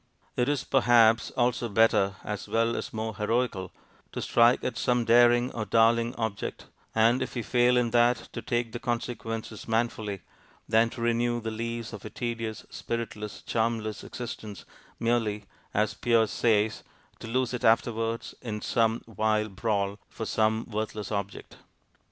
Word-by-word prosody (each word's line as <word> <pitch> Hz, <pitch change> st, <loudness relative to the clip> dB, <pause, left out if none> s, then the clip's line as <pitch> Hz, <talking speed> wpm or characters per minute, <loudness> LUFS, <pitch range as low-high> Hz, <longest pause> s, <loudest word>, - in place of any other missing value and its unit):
It 125 Hz, +2 st, +1 dB
is, 145 Hz, -2 st, 0 dB
perhaps, 120 Hz, -4 st, +4 dB
also 120 Hz, -1 st, +1 dB
better, 100 Hz, -2 st, +3 dB
as 105 Hz, -1 st, -5 dB
well 115 Hz, +1 st, +1 dB
as -, -, -4 dB
more 110 Hz, -1 st, -4 dB
heroical, 105 Hz, -4 st, -1 dB, 0.4 s
to -, -, -3 dB
strike 120 Hz, +1 st, +4 dB
at 125 Hz, -, -2 dB
some 120 Hz, 0 st, +1 dB
daring 120 Hz, +1 st, +5 dB
or 115 Hz, -, -3 dB
darling 115 Hz, +2 st, +3 dB
object, 110 Hz, -4 st, -4 dB, 0.3 s
and 115 Hz, +3 st, +4 dB
if 130 Hz, -, -4 dB
we 120 Hz, -, -2 dB
fail 125 Hz, +2 st, +3 dB
in 120 Hz, -2 st, +1 dB
that, 120 Hz, +1 st, +4 dB, 0.2 s
to -, -, -4 dB
take 120 Hz, -2 st, -1 dB
the 120 Hz, -, -5 dB
consequences 115 Hz, -3 st, -4 dB
manfully, 110 Hz, -4 st, -1 dB, 0.5 s
than 115 Hz, +1 st, +4 dB
to 120 Hz, 0 st, -8 dB
renew 120 Hz, 0 st, +1 dB
the 115 Hz, -1 st, -4 dB
lease 115 Hz, +1 st, -4 dB
of 105 Hz, -, -8 dB
a 110 Hz, -, -6 dB
tedious, 115 Hz, -2 st, -4 dB
spiritless, 110 Hz, -3 st, -5 dB
charmless 110 Hz, -2 st, -1 dB
existence, 110 Hz, -4 st, -7 dB, 0.3 s
merely 110 Hz, -3 st, 0 dB, 0.3 s
(as 105 Hz, 0 st, +1 dB
Pierre 115 Hz, -2 st, +3 dB
says) 110 Hz, -1 st, +1 dB, 0.4 s
'to -, -, -8 dB
lose 130 Hz, +1 st, 0 dB
it 125 Hz, -, -4 dB
afterwards 115 Hz, 0 st, +1 dB
in 105 Hz, -3 st, -4 dB
some 115 Hz, +1 st, +1 dB
vile 110 Hz, 0 st, 0 dB
brawl' 100 Hz, 0 st, -1 dB
for 110 Hz, -, -6 dB
some 110 Hz, +1 st, +1 dB
worthless 110 Hz, -1 st, -4 dB
object. 100 Hz, -1 st, -5 dB
115 Hz, 150 wpm, -28 LUFS, 110-120 Hz, 0.5 s, daring